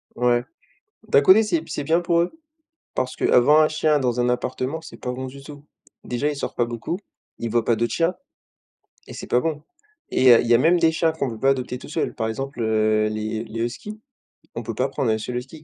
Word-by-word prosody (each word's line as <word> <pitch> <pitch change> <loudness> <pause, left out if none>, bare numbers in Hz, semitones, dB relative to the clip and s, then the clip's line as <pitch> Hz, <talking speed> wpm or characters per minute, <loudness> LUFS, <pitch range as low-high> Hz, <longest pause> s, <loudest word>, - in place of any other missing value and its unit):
Ouais. 120 0 +2 0.6
D'un 140 - +5
côté 190 +9 +6
c'est 180 -7 0
b - - -13
c'est 145 - -4
bien 165 +4 +2
pour 170 -1 +2
eux. 175 - -1 0.6
Parce 130 0 -2
qu'avoir 145 +6 +5
un 155 - +4
chien 155 -1 +1
dans 125 -2 -1
un 120 - +2
appartement, 130 +5 -2
c'est - - -12
pas 125 - -4
bon 130 +1 -5
du 140 +1 -11
tout. 145 0 -11 0.4
Déjà, 125 +5 -1
il 150 - -3
sort - - -5
pas 120 - +1
beaucoup. 120 +8 -4 0.4
Il 115 -1 -4
voit 115 0 +2
pas 115 - +2
d'autres 120 +1 -1
chiens, 170 +2 +1 0.9
et - - -10
c'est - - -7
pas 125 - +2
bon 155 -1 -3 0.5
et 130 -1 +6
heu, 115 - +7
il - - -3
y 120 - +5
a - - +6
même 170 +7 +4
des 165 -1 +4
chats 160 0 +1
qu'on 140 -4 -2
peut 115 - -7
pas 135 +5 +3
adopter 125 -2 -2
tout - - -12
seul. - - -2
Par 110 - -2
exemple, 135 +3 -5
heu, 110 -1 +2
les 110 +1 -3
les 115 0 -6
huskies, 210 - -6 0.6
on - - -3
peut 115 0 -5
pas 130 +4 +1
prendre 130 -3 -1
1 110 - +1
seul 120 +3 -5
husky, 135 +5 -8
130 Hz, 240 wpm, -23 LUFS, 120-155 Hz, 0.9 s, heu